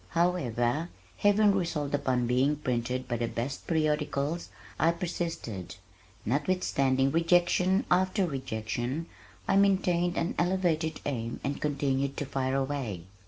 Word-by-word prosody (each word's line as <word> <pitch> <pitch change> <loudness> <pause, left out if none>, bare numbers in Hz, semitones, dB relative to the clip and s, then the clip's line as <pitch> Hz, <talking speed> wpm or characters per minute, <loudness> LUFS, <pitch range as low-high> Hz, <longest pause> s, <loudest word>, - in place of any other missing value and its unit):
However, 165 -4 +1 0.3
having 205 0 +4
resolved 165 -7 -1
upon 130 -4 +1
being 130 +5 +2
printed 125 -2 -2
by 120 - -1
the 115 0 -1
best 120 +4 -4
periodicals 150 0 0 0.3
I 165 +2 +4
persisted. 165 - -4 0.5
Notwithstanding 135 - +1
rejection 175 - +3
after 185 +2 +3
rejection 130 0 -3 0.4
I 195 - +3
maintained 180 -3 +2
an 170 - 0
elevated 175 -3 0
aim 115 -4 -3
and 140 +1 -3
continued 140 -2 0
to 145 - -2
fire 130 0 -1
away. 135 -10 -2
145 Hz, 115 wpm, -29 LUFS, 130-175 Hz, 0.5 s, having